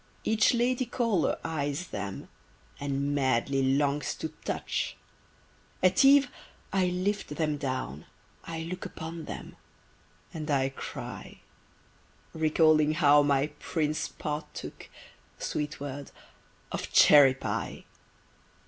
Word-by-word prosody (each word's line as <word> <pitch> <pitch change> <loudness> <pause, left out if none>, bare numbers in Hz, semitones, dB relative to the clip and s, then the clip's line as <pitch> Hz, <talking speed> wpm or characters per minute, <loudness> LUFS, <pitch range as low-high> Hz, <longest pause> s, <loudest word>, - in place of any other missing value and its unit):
Each 220 -1 +3
lady 245 +1 +1
caller 230 -8 +1
eyes 150 +2 -3
them, 100 -1 -5 0.5
And 140 0 -1
madly 135 0 +1 0.2
longs 145 0 0
to 160 - -4
touch! - - -2 0.9
At 185 +5 +5
eve 275 0 +7 0.5
I 190 -2 +3
lift 180 -2 -2
them 155 -2 0
down, 130 - -4 0.4
I 160 -1 -5
look 180 +2 -5
Upon 160 0 -7
them, - - -8 0.8
and 155 -1 -5
I 135 -2 +2
cry; 135 - -8 0.9
Recalling 155 -1 +4
how 145 -2 +6
my 145 0 +2
Prince 155 -1 -1
'partook' 150 0 -6 0.5
(Sweet 150 0 -3
word!) 140 0 -6 0.6
of - - -4
cherry 140 -3 +7
pie! - - -4
150 Hz, 105 wpm, -29 LUFS, 140-170 Hz, 0.9 s, eve